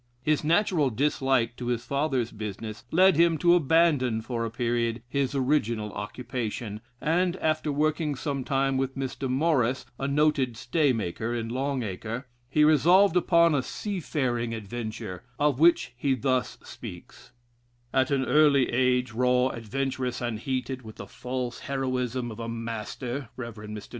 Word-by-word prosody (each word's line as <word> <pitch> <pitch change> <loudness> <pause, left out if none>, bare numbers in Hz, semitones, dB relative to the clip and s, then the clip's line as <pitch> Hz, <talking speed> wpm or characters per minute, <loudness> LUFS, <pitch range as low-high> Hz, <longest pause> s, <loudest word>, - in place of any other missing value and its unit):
His 155 +2 +1
natural 165 -3 +2
dislike 130 -2 +1
to 120 - -5
his 120 -1 -1
father's 140 -4 0
business 105 +2 -6
led 185 +2 +5
him 170 -1 +4
to 175 +3 +4
abandon 150 -8 +3
for 115 -1 -3
a 115 - -2
period 115 0 -1
his 140 +1 -1
original 120 -6 0
occupation, 110 0 -5 0.2
and, 175 +4 +1
after 155 -3 0
working 150 +1 0
some 140 0 -3
time 135 0 +1
with 135 0 -2
Mr. 135 0 -3
Morris, 130 -3 +1
a 135 - -1
noted 140 -4 +1
stay 145 +3 +2
maker, 115 +1 -2
in 115 -1 -3
Long 135 +1 -1
Acre, 110 +5 -5 0.2
he 150 +3 +3
resolved 170 +6 +5
upon 170 -2 +4
a 140 - +2
seafaring 130 - -2
adventure, 110 -4 -6 0.2
of 145 -3 +1
which 160 -7 +4
he 135 +2 +1
thus 130 +1 0
speaks: - - -11 0.6
"At 130 -1 +3
an 135 -2 +1
early 145 -3 +4
age, 125 0 +2
raw, 125 +2 +2
adventurous, 130 +2 -3
and 120 -3 -3
heated 130 +1 -3
with 110 -3 -11
the - - -8
false 125 -1 -5
Heroism 130 -2 -2
of 110 - -9
a 115 0 -4
master 115 +3 -5
[Rev. 120 -2 -5
Mr. 105 -1 -8
130 Hz, 150 wpm, -27 LUFS, 115-145 Hz, 0.6 s, led